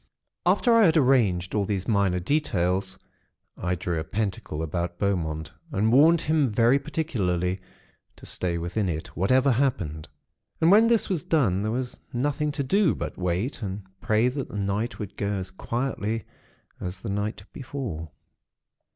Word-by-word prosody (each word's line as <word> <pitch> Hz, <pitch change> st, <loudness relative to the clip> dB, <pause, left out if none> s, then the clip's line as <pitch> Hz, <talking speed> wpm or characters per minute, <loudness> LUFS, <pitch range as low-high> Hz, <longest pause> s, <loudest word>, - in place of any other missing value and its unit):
"After 240 Hz, -, +4 dB
I 230 Hz, -2 st, +6 dB
had 160 Hz, 0 st, +3 dB
arranged 115 Hz, -, +3 dB
all 105 Hz, -, +2 dB
these 95 Hz, -2 st, -2 dB
minor 100 Hz, -4 st, +2 dB
details, 95 Hz, -, 0 dB, 0.6 s
I 90 Hz, +1 st, -1 dB
drew 85 Hz, -1 st, -2 dB
a -, -, -2 dB
pentacle 90 Hz, -4 st, -3 dB
about 85 Hz, +2 st, -3 dB
Beaumont, 80 Hz, -6 st, -1 dB, 0.2 s
and 110 Hz, -2 st, +2 dB
warned 160 Hz, +5 st, +6 dB
him 150 Hz, -4 st, +2 dB
very 115 Hz, +5 st, +4 dB
particularly 95 Hz, -, -1 dB, 0.5 s
to -, -, -14 dB
stay 85 Hz, -2 st, -2 dB
within 90 Hz, +4 st, -1 dB
it, 80 Hz, -1 st, -5 dB
whatever 130 Hz, -, +3 dB
happened. 90 Hz, -, 0 dB, 0.5 s
And 165 Hz, +2 st, +5 dB
when 220 Hz, +3 st, +7 dB
this 230 Hz, -2 st, +3 dB
was 180 Hz, -6 st, -1 dB
done, 110 Hz, -, +2 dB
there 110 Hz, +1 st, -1 dB
was 125 Hz, +1 st, -3 dB
nothing 145 Hz, +4 st, 0 dB
to 145 Hz, -, -1 dB
do 195 Hz, +6 st, +3 dB
but -, -, -5 dB
wait, 90 Hz, -, -2 dB
and 100 Hz, -1 st, -4 dB, 0.2 s
pray 110 Hz, +3 st, +3 dB
that 130 Hz, +1 st, -2 dB
the -, -, -6 dB
night 100 Hz, +4 st, -1 dB
would 100 Hz, -2 st, -6 dB
go 100 Hz, 0 st, -1 dB
as 95 Hz, -2 st, -3 dB
quietly 115 Hz, 0 st, -2 dB, 0.6 s
as 90 Hz, +1 st, -6 dB
the 115 Hz, -, -5 dB
night 105 Hz, +1 st, -2 dB
before. 120 Hz, -, -5 dB
105 Hz, 160 wpm, -26 LUFS, 90-135 Hz, 0.6 s, when